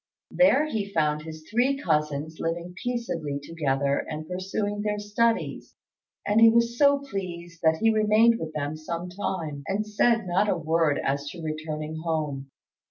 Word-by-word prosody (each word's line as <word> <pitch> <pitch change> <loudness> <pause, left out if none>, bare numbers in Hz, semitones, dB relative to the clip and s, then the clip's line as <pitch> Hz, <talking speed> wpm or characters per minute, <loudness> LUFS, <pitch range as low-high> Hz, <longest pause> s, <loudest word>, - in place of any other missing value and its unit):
There 280 +2 +4
he 215 -9 -3
found 150 -3 +1
his 155 0 -10
three 250 +5 +2
cousins 150 - -1
living 170 +2 -3
peaceably 170 -13 -3
together 140 -2 0
and 155 0 -5
pursuing 200 +3 -3
their 210 0 -1
studies, 215 +3 -1 0.5
and 210 +2 +3
was 235 0 +3
so 280 +2 +5
pleased 175 -10 -6
that 160 -1 +3
he 225 +5 +3
remained 220 +2 +4
with 160 -1 -5
them 145 0 -3
some 170 +3 -5
time, 170 -6 -3
and 205 +2 -1
said 220 +1 +2
not 185 +4 +1
a - - +1
word 160 -2 +1
as 140 +1 -1
to 170 0 -9
returning 155 0 -4
home. 150 -5 -2
170 Hz, 155 wpm, -26 LUFS, 155-215 Hz, 0.5 s, so